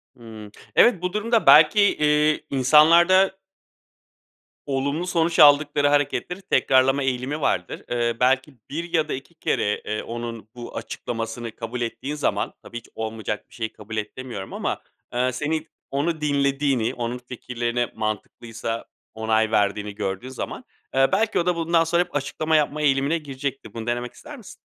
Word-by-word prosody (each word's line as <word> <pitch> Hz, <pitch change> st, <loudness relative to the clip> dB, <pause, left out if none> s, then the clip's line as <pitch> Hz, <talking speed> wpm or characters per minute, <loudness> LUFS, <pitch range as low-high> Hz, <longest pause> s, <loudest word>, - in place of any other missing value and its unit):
Hıı. 110 Hz, -3 st, -11 dB, 0.2 s
Evet, 230 Hz, -8 st, +5 dB
bu 180 Hz, 0 st, -2 dB
durumda, 225 Hz, +2 st, +1 dB
belki, 155 Hz, +7 st, +7 dB
eee, 150 Hz, -5 st, +2 dB
insanlarda 170 Hz, +8 st, +5 dB, 1.3 s
olumlu 140 Hz, +5 st, -1 dB
sonuç 170 Hz, -1 st, +1 dB
aldıkları 145 Hz, -1 st, +6 dB
hareketleri 145 Hz, +6 st, 0 dB
tekrarlama 135 Hz, -7 st, +3 dB
eğilimi 135 Hz, +3 st, -2 dB
vardır. 90 Hz, -9 st, -1 dB
Eee, 120 Hz, -1 st, 0 dB
belki 135 Hz, +3 st, +2 dB, 0.2 s
1 170 Hz, +4 st, -5 dB
ya 160 Hz, -2 st, +2 dB
da -, -, -3 dB
2 135 Hz, +6 st, -8 dB
kere, 105 Hz, -8 st, -1 dB
eee, 110 Hz, 0 st, -3 dB
onun 115 Hz, -2 st, -6 dB
bu 120 Hz, -1 st, -8 dB
açıklamasını 115 Hz, 0 st, -5 dB
kabul 120 Hz, +1 st, -5 dB
ettiğin 135 Hz, +5 st, -4 dB
zaman, 150 Hz, -, -1 dB
tabii 120 Hz, -, -8 dB
hiç 115 Hz, -, -10 dB
olmayacak 110 Hz, -1 st, -4 dB
bir -, -, -21 dB
şeyi 115 Hz, -2 st, -3 dB
kabul 110 Hz, +1 st, -8 dB
et 105 Hz, 0 st, -4 dB
demiyorum 120 Hz, -7 st, -7 dB
ama, -, -, -3 dB, 0.3 s
eee, 125 Hz, +1 st, +1 dB
senin 155 Hz, +4 st, -2 dB, 0.2 s
onu 155 Hz, +3 st, -1 dB
dinlediğini, 140 Hz, -4 st, +1 dB
onun 120 Hz, 0 st, -3 dB
fikirlerine 120 Hz, -1 st, -3 dB
mantıklıysa 115 Hz, +1 st, -4 dB, 0.3 s
onay 110 Hz, 0 st, +1 dB
verdiğini 105 Hz, -1 st, 0 dB
gördüğü 95 Hz, +7 st, -4 dB
zaman, 130 Hz, -, -6 dB, 0.3 s
eee, 135 Hz, 0 st, +5 dB
belki, 220 Hz, +3 st, +2 dB
o 170 Hz, -, 0 dB
da, 180 Hz, -, +2 dB
bundan 165 Hz, 0 st, +2 dB
sonra 170 Hz, +2 st, +2 dB
hep 180 Hz, -, -17 dB
açıklama 150 Hz, +3 st, 0 dB
yapma 150 Hz, 0 st, +1 dB
eğilimine 140 Hz, +2 st, +2 dB
girecektir. 140 Hz, -3 st, -6 dB
Bunu 115 Hz, 0 st, -6 dB
denemek 120 Hz, 0 st, -2 dB
ister 295 Hz, -2 st, -11 dB
misin? 220 Hz, -, -12 dB
135 Hz, 155 wpm, -23 LUFS, 115-155 Hz, 1.3 s, belki